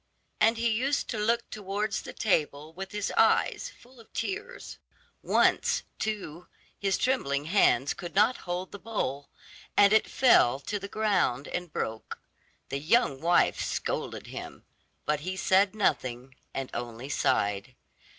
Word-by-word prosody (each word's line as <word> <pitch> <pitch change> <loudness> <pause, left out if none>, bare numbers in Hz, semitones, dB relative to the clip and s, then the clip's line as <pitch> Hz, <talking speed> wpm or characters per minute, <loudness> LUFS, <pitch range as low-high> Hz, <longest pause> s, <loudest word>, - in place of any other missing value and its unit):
And 225 +2 +4
he 230 0 +1
used 265 +6 0
to 220 - -2
look 235 +3 +1
towards 210 +1 -2
the - - -8
table 155 -6 -1
with 190 +3 -7
his 210 -1 -3
eyes - - +3
full 250 +1 -19
of 225 - -17
tears. 430 +6 -5 0.4
Once, - - +2 0.2
too, 180 -6 -4 0.3
his 195 -2 +1
trembling 145 - 0
hands 145 - +3
could 175 -1 -8
not 215 +6 +4
hold 180 +1 -3
the 200 - -8
bowl, 145 -11 -3 0.5
and 205 +1 +7
it 220 - +4
fell 135 - +5
to 205 +8 -3
the 200 - -6
ground 195 - 0
and 180 -2 -4
broke. 110 -5 -4 0.5
The 140 - -2
young 155 - +2
wife 175 +2 +3
scolded - - -3
him, - - -9 0.4
but 150 -1 +1
he 185 +5 -4
said 195 +2 +3
nothing 130 - -1 0.2
and 135 -1 -5
only 120 +1 -5
sighed. 100 -4 0
190 Hz, 145 wpm, -28 LUFS, 140-220 Hz, 0.5 s, and